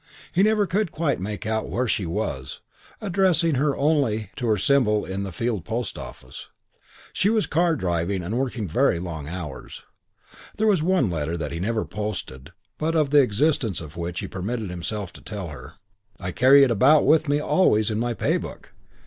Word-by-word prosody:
He 180 - +3
never 215 0 +3
could 190 0 -1
quite 150 - -1
make 105 +4 -5
out 110 0 -1
where 125 +1 -1
she 100 -4 0
was, 80 -9 -4 0.4
addressing 180 -5 +2
her 140 +1 +1
only 135 - +1
to 120 - -3
her 110 -2 +3
symbol 105 -1 +2
in 95 +1 -4
the 100 -1 -4
Field 110 0 -2
post 115 +2 -3
office. - - -10 0.6
She 200 - +2
was 220 -1 +2
car 170 +1 +2
driving 90 - -1
and 100 +7 -3
working 125 -5 -2
very 105 - +2
long 85 -4 -6
hours. 80 -5 -7 0.7
There 220 - +1
was 200 -7 +3
one 170 - +2
letter 80 +1 -2
that 80 - -4
he 85 - -4
never 110 +4 -1
posted 105 -11 -6 0.3
but 160 +2 0
of 150 -4 +2
the 145 -1 +7
existence 120 - +1
of 75 -2 -10
which 85 0 -4
he - - -5
permitted 100 +1 -4
himself 90 +2 -5
to - - -13
tell 100 -5 -6
her. 70 -5 -10 0.5
"I 90 -1 -4
carry 135 +7 +6
it 130 - +3
about 135 +7 +5
with 155 -1 +4
me 145 +1 +2
always 110 - +2
in 105 - -1
my 120 0 -1
Pay - - +1
book. - - -9
110 Hz, 190 wpm, -24 LUFS, 90-150 Hz, 0.7 s, the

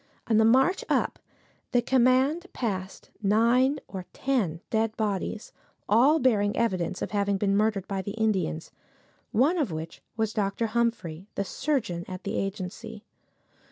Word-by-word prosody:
On 220 - +2
the 220 - +5
march 265 +11 +4
up - - +1 0.5
the 245 - +4
command 265 +8 +3
passed 190 -5 -4
nine 235 +7 +3
or 185 -2 -7
ten 220 -12 0
dead 220 0 0
bodies, 210 0 -2 0.3
all 255 +9 +5
bearing 210 -7 +2
evidence 185 -6 0
of - - -4
having 200 -1 +1
been 195 0 +1
murdered 210 -2 +1
by 195 -1 -2
the 200 +2 -5
Indians, 210 - -1 0.6
one 290 - +3
of 270 - 0
which 160 +1 -6 0.2
was 220 -1 0
Dr. 205 +2 0
Humphrey, 215 -7 -1 0.2
surgeon 230 - -2
at 185 -1 -7
the - - -3
agency. 205 +3 -5
215 Hz, 140 wpm, -27 LUFS, 195-245 Hz, 0.6 s, the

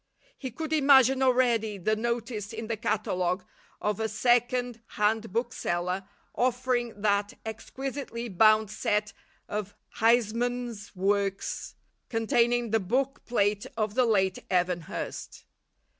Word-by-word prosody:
He 260 - -6
could 315 +6 -4
imagine 270 -3 +5
already 240 -5 +2
the 215 +4 +1
notice 230 -1 -3
in 225 0 -5
the 225 0 -2
catalogue 185 -4 -1 0.3
of 210 0 -1
a 220 0 0
second 245 +1 +1 0.2
hand 220 0 +1
bookseller 185 -5 -2 0.3
offering 245 -2 0
that 205 -1 +2
exquisitely 240 +2 -5
bound 215 +1 +4
set 210 -1 -1 0.3
of 205 -1 -4 0.2
Huysman's 235 -1 +1
works, 195 +1 -1 0.3
"containing 240 0 +2
the 225 - +3
book 260 +8 -1
plate 205 -3 +1
of 215 -2 0
the 250 +2 +3
late 190 -4 +2
Evan 180 -1 +1
Hurst." - - -6
225 Hz, 115 wpm, -28 LUFS, 205-245 Hz, 0.3 s, imagine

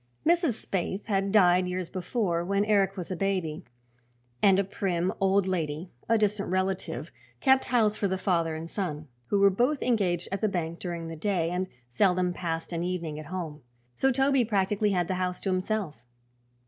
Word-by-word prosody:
Mrs. 335 -4 +3
Spaythe 190 +1 -2
had 195 -2 0
died 180 -3 +5
years 180 -1 -3
before, 180 -2 -1
when 200 +3 +1
Eric 200 -2 +2
was 180 0 -5
a - - -1
baby, 185 -5 -1 0.8
and 195 -2 +6
a 200 - +3
prim 185 -2 -1
old 195 0 +3
lady, 165 -2 -2 0.2
a 230 - +5
distant 210 -1 0
relative, 185 +1 -2 0.3
kept 265 -1 +4
house 220 -4 +2
for 200 - +1
the 190 0 -1
father 170 -4 0
and 160 +1 -6
son, 155 -5 -4 0.2
who 205 - +1
were 200 0 +6
both 250 +9 +1
engaged 185 -8 +1
at 195 - -2
the 215 - +2
bank 170 -3 -3
during 170 -2 -4
the 165 - -6
day 170 0 0
and 185 +1 -1 0.2
seldom 180 +7 +2
passed 165 -1 -4
an 170 0 -1
evening 170 -4 -3
at 155 - -9
home. 160 -4 -5 0.3
So 270 - +2
Toby 270 0 +3
practically 210 -1 +1
had 180 -3 +1
the - - -1
house 180 0 -1
to 195 - -1
himself. 185 - -2
185 Hz, 185 wpm, -28 LUFS, 175-205 Hz, 0.8 s, and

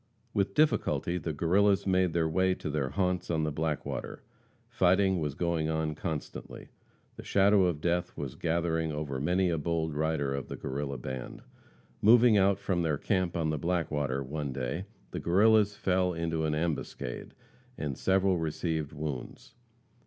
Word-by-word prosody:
With 100 -1 0
difficulty 120 - +2
the 80 - -3
Guerrillas 95 +6 +2
made 95 -3 +2
their 80 -2 +2
way 95 +3 +2
to 75 - -5
their 70 -3 -1
haunts 90 -1 -1
on 80 -2 +1
the 75 - 0
Blackwater. 75 -3 -3 0.4
Fighting 95 +1 +3
was 75 -4 -2
going 85 -2 0
on 80 -1 -1
constantly. 80 -1 -6 0.5
The - - -8
shadow 100 -1 +4
of 85 -4 -1
death 85 +1 -1
was 70 -4 -4
gathering 80 -1 -1
over 75 -3 -3
many 90 +5 +1
a 80 - 0
bold 80 0 -1
rider 75 -2 0
of 70 -1 -4
the - - -5
Guerrilla 70 0 -4
band. 65 0 -7 0.6
Moving 115 +1 +6
out 100 0 +4
from 95 -3 -1
their 80 -3 0
camp 95 0 0
on 80 -2 0
the 75 - -2
Blackwater, 75 -6 -1
one 75 +1 -4
day, 70 +8 -3 0.3
the - - -4
Guerrillas 105 +3 +4
fell 90 -2 +1
into 80 -1 -1
an 75 -1 0
ambuscade, 75 -6 -4 0.4
and 70 -3 -3
several 95 +1 +2
received 80 -1 -2
wounds. 75 -4 -6
80 Hz, 160 wpm, -30 LUFS, 75-95 Hz, 0.6 s, Moving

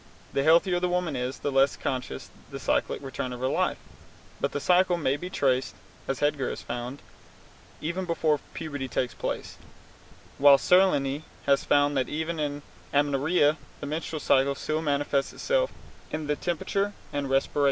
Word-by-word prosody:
The 135 - +2
healthier 170 +4 +4
the 180 0 0
woman 175 -4 0
is, 125 +1 -3
the 145 - -2
less 135 0 +4
conscious 125 - -3
is - - -15 0.2
the - - -7
cyclic - - 0
return 130 -1 -4
of 125 - -7
her 130 - 0
life, - - +1 0.6
but - - 0
the - - -2
cycle 180 +3 +3
may 140 -5 +1
be 180 +5 -6
traced 130 -7 +1 0.3
(as 135 - -2
Hegar 145 -3 +1
has - - -6
found) 120 +3 -5 0.8
even 170 +4 -2
before 160 -3 +1 0.2
puberty 145 -4 -4
takes 125 -1 -1
place, - - -4 0.8
while 140 0 +8
Salerni 145 -5 +3 0.2
has 140 -1 +3
found 145 0 +3
that 130 - 0
even 160 +2 -2
in 145 -1 -2 0.3
amenorrhoea 145 +2 +3 0.2
the - - -6
menstrual 155 +1 -3
cycle 135 +1 +3
still 155 +3 -2
manifests 145 -2 0
itself - - +1 0.4
in 155 0 -3
the 150 0 0
temperature 195 +5 -1 0.2
and 140 -1 -2
respiration. 135 +2 +1
145 Hz, 165 wpm, -27 LUFS, 135-165 Hz, 0.8 s, while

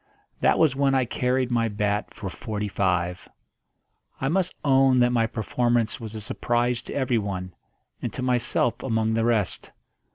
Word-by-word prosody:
That - - +3
was 155 -5 +3
when 135 0 +2
I 130 -1 +2
carried 125 +1 0
my 115 -1 +2
bat 105 0 -1
for 115 -4 -7
forty 105 +2 -4
five. 90 -3 -1 0.9
I 135 - 0
must 180 +2 0
own 135 -2 +5
that 120 0 +4
my 115 -2 +2
performance 120 +1 0
was 110 -2 -7
a 110 - -5
surprise 120 +3 0
to - - -8
everyone 100 -9 -1 0.5
and - - -3
to - - -4
myself 120 -1 +1
among 110 -3 0
the 115 0 +1
rest. 110 -5 0
120 Hz, 160 wpm, -25 LUFS, 105-125 Hz, 0.9 s, own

